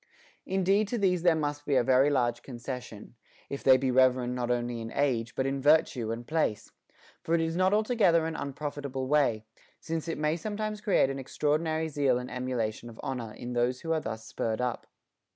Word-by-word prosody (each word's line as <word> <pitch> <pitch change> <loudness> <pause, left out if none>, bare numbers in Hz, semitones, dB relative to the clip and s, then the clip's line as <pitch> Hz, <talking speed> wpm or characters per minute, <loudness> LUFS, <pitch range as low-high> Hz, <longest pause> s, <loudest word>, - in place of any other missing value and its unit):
Indeed 195 +2 +2
to 240 - -2
these 185 -4 +2
there 175 -1 +4
must 145 -1 -2
be 145 -2 0
a 125 - +4
very 130 +3 +4
large 120 -4 +1
concession, 125 -4 -8 0.4
if 140 - -5
they 130 -1 +7
be 130 0 0
reverend 125 -1 +3
not 125 -1 -2
only 120 -1 -1
in 115 0 -6
age, 120 -5 0
but 130 - 0
in 135 0 -1
virtue 140 -6 +3
and 115 +1 -5
place; 155 -9 -1 0.5
for 165 - +1
it - - +2
is 165 0 -1
not 185 +1 +3
altogether 210 -6 +3
an 160 0 -3
unprofit 145 +1 -5
able 135 -1 -3
way, 130 -7 +2 0.3
since 165 0 -4
it 165 - -2
may 155 +2 0
sometimes 215 +3 -4
create 195 -10 +3
an 135 - -5
extraordinary 155 +4 0
zeal 140 -4 +1
and 125 0 -6
emulation 120 -3 -3
of 115 - -13
honor 120 -4 -4
in 120 +2 -7
those 120 +1 0
who. 165 - -3
are 160 - +2
thus 110 -4 -6
spurred 110 0 -3
up. 125 -1 -2
135 Hz, 200 wpm, -29 LUFS, 125-160 Hz, 0.5 s, they